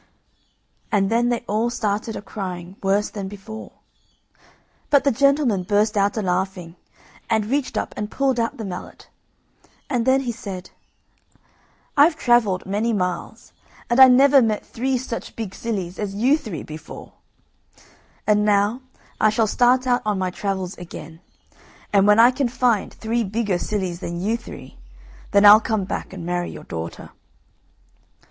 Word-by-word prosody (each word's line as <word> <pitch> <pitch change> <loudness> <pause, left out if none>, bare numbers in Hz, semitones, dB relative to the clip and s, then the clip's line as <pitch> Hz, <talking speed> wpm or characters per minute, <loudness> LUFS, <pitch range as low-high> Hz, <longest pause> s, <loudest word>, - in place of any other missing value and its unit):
And 195 -1 +2
then 240 +1 +2
they 240 -1 0
all 220 +3 0
started 215 -2 -2
a - - -7
crying 185 -3 -6
worse 200 +2 +1
than 200 -2 -5
before. 205 +3 -9 1.2
But 285 -2 +4
the 280 - +3
gentleman 275 -5 +2
burst 210 +4 +1
out 200 +1 +1
a 215 - -1
laughing, 180 -2 -2 0.5
and 220 -2 +1
reached 270 +4 -1
up - - -3
and 210 0 -4
pulled 265 -1 0
out 230 0 -1
the 220 - -5
mallet, 180 -2 -8 0.8
and 245 -2 0
then 265 +1 +4
he 250 -3 -2
said: 195 -5 -8 1.2
"I've 305 +3 +5
travelled 240 -9 +2
many 210 +4 -1
miles, 180 -3 -4 0.4
and 240 - +3
I 265 - +11
never 270 +2 +6
met 220 -3 0
three 260 +2 -1
such 240 -2 -6
big 215 -4 -5
sillies 190 -6 -4
as 200 -2 -3
you 250 +8 +3
three 215 - -6
before; 155 0 -10 1.1
and 210 0 +3
now 210 +4 +2 0.4
I 215 - +4
shall 220 +1 +2
start 250 +4 +3
out 245 -1 +2
on 210 -2 -1
my 185 -1 -1
travels 190 -1 -3
again, 165 -2 -10 0.7
and 200 0 +4
when 210 +1 +5
I 240 +2 +8
can 255 -1 -1
find 240 -4 +1
three 230 +1 -2
bigger 205 -2 -1
sillies 185 -5 -3
than 170 -2 -5
you 210 +5 0
three, 235 - -10 0.5
then 205 0 +4
I'll 210 +2 +9
come 220 -2 -1
back 190 - -5
and 185 -3 -8
marry 175 0 -2
your - - -9
daughter." 80 0 -7
210 Hz, 155 wpm, -22 LUFS, 190-240 Hz, 1.2 s, I